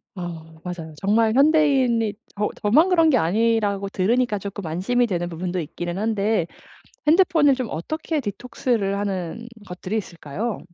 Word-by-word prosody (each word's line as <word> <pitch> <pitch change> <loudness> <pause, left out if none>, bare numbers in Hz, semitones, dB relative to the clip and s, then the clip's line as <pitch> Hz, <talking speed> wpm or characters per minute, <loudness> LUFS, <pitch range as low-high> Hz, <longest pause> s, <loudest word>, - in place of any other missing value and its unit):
어. 165 -3 -8
맞아요. 170 -3 -6
정말 220 +3 +3
현대인이 270 -6 +3 0.2
저 210 +1 0
저만 290 - +4
그런 330 -3 +4
게 270 - +4
아니라고 205 +1 +1
들으니까 220 +4 +1
쪼끔 200 -1 -6
안심이 220 +10 +1
되는 175 -4 -2
부분도 180 +2 -3
있기는 175 +2 -5
한데 215 -2 +1 0.6
핸드폰을 320 -4 +5
좀 255 -2 -3
어떻게 310 - -3
디톡스를 205 -2 -2
하는 200 +2 -3 0.2
것들이 185 +4 -4
있을까요? 190 +3 -4
210 Hz, 335 characters per minute, -23 LUFS, 180-245 Hz, 0.6 s, 핸드폰을